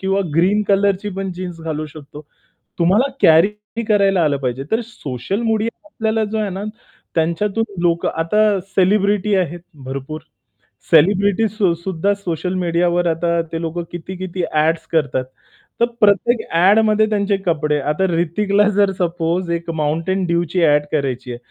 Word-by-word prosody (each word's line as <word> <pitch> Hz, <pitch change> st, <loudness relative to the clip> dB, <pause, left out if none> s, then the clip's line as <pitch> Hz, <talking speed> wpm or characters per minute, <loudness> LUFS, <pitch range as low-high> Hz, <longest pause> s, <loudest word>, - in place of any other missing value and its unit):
किंवा 195 Hz, +1 st, 0 dB
ग्रीन 195 Hz, +5 st, +3 dB
कलरची 200 Hz, 0 st, +2 dB
पण 195 Hz, -1 st, -3 dB
जीन्स 175 Hz, -2 st, -7 dB
घालू 155 Hz, -1 st, -4 dB
शकतो." 150 Hz, 0 st, -12 dB, 0.6 s
तुम्हाला 200 Hz, +11 st, +3 dB
कॅरी 210 Hz, +7 st, +3 dB
करायला 195 Hz, -4 st, +3 dB
आलं 145 Hz, -2 st, +1 dB
पाहिजे. 130 Hz, 0 st, -3 dB
तर 225 Hz, -, +1 dB
सोशल 155 Hz, -, -5 dB
मीडिया 225 Hz, 0 st, 0 dB
आपल्याला 220 Hz, -6 st, -1 dB
जो 220 Hz, -, -2 dB
आहे 210 Hz, -2 st, -1 dB
ना, 190 Hz, +2 st, -5 dB, 0.5 s
त्यांच्यातून 185 Hz, +7 st, 0 dB, 0.2 s
लोक 170 Hz, -1 st, +1 dB
आता 165 Hz, +6 st, -1 dB, 0.2 s
सेलिब्रिटी 200 Hz, +2 st, +1 dB
आहेत 175 Hz, -2 st, -1 dB, 0.2 s
भरपूर. 135 Hz, +4 st, -6 dB, 0.7 s
सेलिब्रिटी 200 Hz, +6 st, +4 dB
सु 200 Hz, -4 st, +1 dB
सुद्धा 185 Hz, +3 st, -1 dB
सोशल 180 Hz, -2 st, -3 dB
मीडियावर 175 Hz, 0 st, +1 dB
आता 170 Hz, +1 st, 0 dB
ते 165 Hz, 0 st, -3 dB
लोक 165 Hz, +1 st, -3 dB
किती-किती 180 Hz, +1 st, -5 dB
ॲड्स 160 Hz, +2 st, +1 dB
करतात. 140 Hz, -5 st, +1 dB, 0.6 s
तर -, -, +6 dB, 0.2 s
प्रत्येक 210 Hz, +3 st, +3 dB
ॲडमध्ये 215 Hz, +5 st, +4 dB
त्यांचे 200 Hz, -1 st, +1 dB
कपडे 150 Hz, -3 st, +1 dB
आता 150 Hz, +6 st, -1 dB
हृतिकला 200 Hz, +5 st, +1 dB
जर 200 Hz, -1 st, +4 dB
सपोज 170 Hz, 0 st, -1 dB
एक 170 Hz, 0 st, -3 dB
Mountain 165 Hz, +6 st, -1 dB
Dewची 170 Hz, +1 st, 0 dB
ॲड 150 Hz, 0 st, +3 dB
करायची 130 Hz, -4 st, -2 dB
आहे. 120 Hz, -, -5 dB
180 Hz, 140 wpm, -19 LUFS, 165-200 Hz, 0.7 s, तर